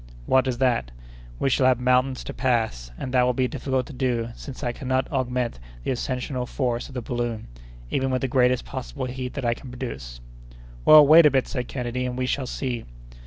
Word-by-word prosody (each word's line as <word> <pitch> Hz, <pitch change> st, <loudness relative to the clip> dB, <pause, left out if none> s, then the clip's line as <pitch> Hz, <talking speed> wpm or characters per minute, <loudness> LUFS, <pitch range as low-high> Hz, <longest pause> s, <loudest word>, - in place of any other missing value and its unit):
"What 130 Hz, 0 st, +3 dB
is 125 Hz, -2 st, -1 dB
that?" 120 Hz, -, +1 dB, 0.5 s
"We 135 Hz, -, +1 dB
shall 130 Hz, +1 st, +4 dB
have 125 Hz, -2 st, +3 dB
mountains 125 Hz, +1 st, +2 dB
to -, -, -6 dB
pass, 110 Hz, -, 0 dB
and 130 Hz, -, -5 dB
that 125 Hz, -, +5 dB
will 125 Hz, 0 st, +2 dB
be 130 Hz, 0 st, +2 dB
difficult 130 Hz, -1 st, -2 dB
to -, -, -10 dB
do, 125 Hz, -3 st, -1 dB
since 135 Hz, 0 st, -9 dB
I 120 Hz, -, 0 dB
cannot 130 Hz, +1 st, -1 dB
augment 125 Hz, -, -1 dB, 0.2 s
the -, -, -1 dB
ascensional 125 Hz, 0 st, -3 dB
force 120 Hz, -3 st, -2 dB
of 135 Hz, -, -13 dB
the 125 Hz, -, -3 dB
balloon, 120 Hz, -2 st, -3 dB, 0.5 s
even 135 Hz, 0 st, 0 dB
with 130 Hz, -1 st, 0 dB
the 135 Hz, -, 0 dB
greatest 125 Hz, -1 st, +2 dB
possible 130 Hz, 0 st, -5 dB
heat 125 Hz, 0 st, -5 dB
that 140 Hz, -3 st, -3 dB
I 120 Hz, -, +3 dB
can 125 Hz, +2 st, -11 dB
produce." 65 Hz, -, -7 dB, 0.7 s
"Well, 155 Hz, -1 st, +9 dB
wait 155 Hz, +2 st, +8 dB
a -, -, +6 dB
bit," 135 Hz, -2 st, +1 dB
said 125 Hz, -2 st, -3 dB
Kennedy, 125 Hz, 0 st, -3 dB
"and 125 Hz, 0 st, -4 dB
we 130 Hz, -, 0 dB
shall 130 Hz, 0 st, -1 dB
see!" 125 Hz, -2 st, -3 dB
125 Hz, 210 wpm, -24 LUFS, 120-130 Hz, 0.7 s, Well